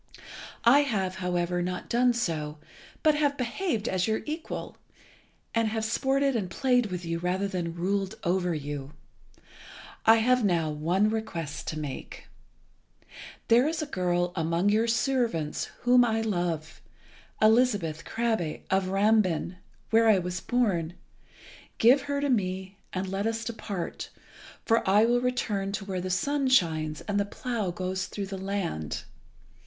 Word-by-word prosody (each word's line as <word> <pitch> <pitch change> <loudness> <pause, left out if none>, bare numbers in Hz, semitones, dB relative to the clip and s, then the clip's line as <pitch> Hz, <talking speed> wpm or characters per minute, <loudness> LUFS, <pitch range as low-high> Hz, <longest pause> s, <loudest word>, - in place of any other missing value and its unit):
I 255 +5 +7
have, 195 -10 -1
however, 180 -1 -1
not 180 0 -3
done 245 +1 +3
so, 160 -9 -2 0.5
but 310 - +5
have 290 -1 +1
behaved 245 - -2
as 185 +1 0
your 220 0 0
equal, 315 +2 -5 0.8
and 230 -1 +2
have 220 0 -2
sported 270 +4 +1
and 200 -6 -1
played 250 +1 +2
with 180 -2 -5
you 165 0 -2
rather 185 +3 0
than 175 -4 -3
ruled 195 +2 -1
over 180 -1 +1
you. 145 -1 -5 1.1
I 225 - +7
have 250 +2 +3
now 170 -6 +1
one 175 +8 +1
request 170 -9 -4
to 155 - -3
make. 145 -3 -7 1.2
There 240 +4 +5
is 320 0 -1
a - - -3
girl 180 -8 0
among 170 +3 +1
your 220 +3 +2
servants 230 - 0 0.2
whom 245 0 +5
I 225 -2 +1
love, 175 -7 -2 0.6
Elizabeth 215 -8 +3
Krabbe, 225 -9 -1
of 190 0 +2
Rambin, 195 -3 +2 0.3
where 225 0 +5
I 210 - +6
was 180 0 -3
born. 185 -9 0 0.8
Give 250 +5 +6
her 285 0 -2
to 285 - 0
me 190 -3 -2
and 185 +1 -3
let 195 +3 -1
us 225 0 -2
depart, 215 -6 -5 0.6
for 230 0 +3
I 205 +3 +5
will 240 +1 +2
return 215 -6 -1
to 205 -1 -4
where 190 -2 -3
the 185 - -4
sun 275 +9 0
shines 160 - +2
and 205 -1 -1
the - - +3
plough 220 -1 -3
goes 185 +1 -3
through 200 - -5
the 195 0 -6
land. 190 - -3
200 Hz, 150 wpm, -28 LUFS, 175-235 Hz, 1.2 s, I